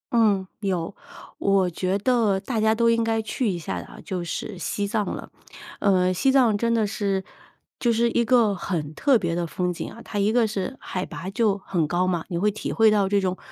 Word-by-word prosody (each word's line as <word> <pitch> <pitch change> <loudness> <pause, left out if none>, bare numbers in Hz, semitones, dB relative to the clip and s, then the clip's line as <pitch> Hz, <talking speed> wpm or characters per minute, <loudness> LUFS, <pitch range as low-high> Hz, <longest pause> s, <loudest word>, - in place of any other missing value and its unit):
嗯， 205 -5 +3
有。 190 -2 -2 0.4
我 195 -2 +3
觉 185 +3 -1
得 215 -3 +2
大 225 +2 -2
家 220 0 +3
都 230 +1 +2
应 230 0 +3
该 225 0 +1
去 220 +2 -1
一 180 - -1
下 165 - -4
的 - - -13
就 180 -2 -3
是 185 +3 -5
西 200 +3 -2
藏 210 +1 0
了。 - - -6 0.5
呃， 185 -2 +3
西 265 +9 +2
藏 250 -5 +4
真 230 +3 0
的 220 -2 +2
是 200 -2 -1 0.6
就 240 - +2
是 235 +1 +2
一 235 - +2
个 230 -3 +4
很 160 -5 -3
特 270 - +3
别 170 -4 -1
的 175 0 -1
风 180 +2 -2
景 - - -5
啊， - - -12
它 210 - -5
一 200 +2 +2
个 235 0 +3
是 215 +5 -4
海 185 - -4
拔 180 - -7
就 205 -1 +1
很 180 -4 -1
高 175 +3 +1
嘛， 175 -3 0
你 175 - -2
会 205 +5 +2
体 215 - -5
会 225 -1 +5
到 200 -2 +2
这 200 0 +3
种 185 -1 -1
200 Hz, 235 characters per minute, -24 LUFS, 185-225 Hz, 0.6 s, 会